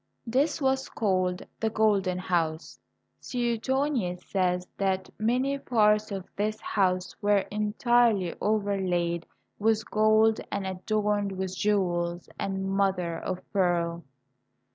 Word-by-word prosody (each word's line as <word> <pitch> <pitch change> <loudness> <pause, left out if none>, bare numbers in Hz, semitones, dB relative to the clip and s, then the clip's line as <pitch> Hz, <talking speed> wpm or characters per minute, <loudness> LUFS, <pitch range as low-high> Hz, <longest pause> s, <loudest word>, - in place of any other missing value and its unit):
This 265 +8 +1
was 265 -1 0
called 185 -4 0
the 220 - +1
Golden 205 -4 +2
House. 165 -3 -2 0.4
Suetonius 240 -5 -1
says 180 -2 0
that 190 -1 -1
many 255 +5 +1
parts 215 -4 +2
of 195 -2 -4
this 215 +1 -1
house 185 -3 0
were 205 -1 +3
entirely 215 -2 +2
overlaid 190 -5 0 0.3
with 220 0 +1
gold 215 +1 +4
and 200 -1 -2
adorned 205 +1 -1
with 190 0 -4
jewels 175 -4 0
and 195 0 -2
mother 180 -4 0
of 185 -1 -5
pearl. 170 -3 +1
200 Hz, 110 wpm, -27 LUFS, 180-220 Hz, 0.4 s, gold